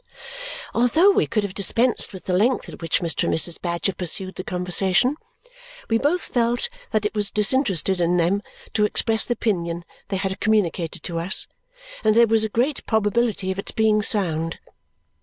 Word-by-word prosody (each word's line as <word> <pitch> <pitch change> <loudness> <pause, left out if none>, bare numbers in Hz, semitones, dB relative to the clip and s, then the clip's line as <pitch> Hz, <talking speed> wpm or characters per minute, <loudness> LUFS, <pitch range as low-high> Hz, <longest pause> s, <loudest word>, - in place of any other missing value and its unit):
Although 315 +12 +4
we - - +2
could 215 -2 0
have 200 -2 -4
dispensed 230 +5 +1
with 190 -2 -10
the 185 - -1
length 230 +8 +2
at - - -10
which 165 - 0
Mr. 170 -2 -1
and - - +1
Mrs. 165 +1 +3
Badger 175 +2 -1
pursued 185 +2 -2
the 185 - -6
conversation, 185 - +1 0.8
we 225 - +3
both 320 +7 +1
felt 240 - 0 0.2
that 215 -1 0
it 210 - -1
was 205 -2 0
disinterested 195 - +1
in 175 +1 +2
them 180 +4 +1 0.3
to 210 - +3
express 220 +1 +1
the 240 - 0
opinion 170 -7 -2 0.2
they 195 - -2
had 190 0 -3
communicated 190 -6 0
to 170 -1 -3
us 180 +4 +1 0.6
and 215 -1 +3
that - - +2
there - - +7
was 225 -1 +3
a 220 - -1
great 250 +7 0
probability 220 -2 +1
of 190 - -4
its - - -5
being 215 -1 +3
sound. 165 -6 0
205 Hz, 180 wpm, -23 LUFS, 180-225 Hz, 0.8 s, there